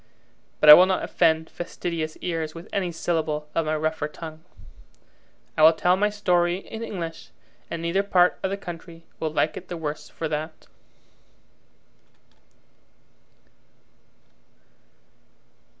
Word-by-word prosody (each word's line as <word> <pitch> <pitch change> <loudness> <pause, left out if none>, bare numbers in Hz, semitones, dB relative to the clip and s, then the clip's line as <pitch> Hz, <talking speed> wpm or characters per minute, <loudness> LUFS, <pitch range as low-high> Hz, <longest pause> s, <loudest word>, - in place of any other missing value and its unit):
But 155 - +2
I 150 - +14
will 180 +4 +8
not 190 -1 0
offend 160 -2 +2
fastidious 170 -2 -5
ears 165 -3 -3
with 165 +1 -10
any 185 -3 -1
syllable 160 -2 -2
of 165 -2 0
my 155 - +1
rougher 155 0 -1
tongue. 160 0 -10 1.1
I - - 0
will 160 +1 +8
tell 180 +3 +2
my 205 +2 +1
story 180 -4 +1
in 220 +3 -9
English, 170 -7 -6 0.4
and 170 -1 -5
neither 170 +4 +1
part 180 -3 +3
of 190 - -1
the 195 - -3
country 170 -3 -10
will 160 - -1
like 155 0 0
it - - -9
the 175 - -5
worse 150 -2 -5
for 165 - -4
that. 155 +1 -5
165 Hz, 130 wpm, -24 LUFS, 155-180 Hz, 1.1 s, I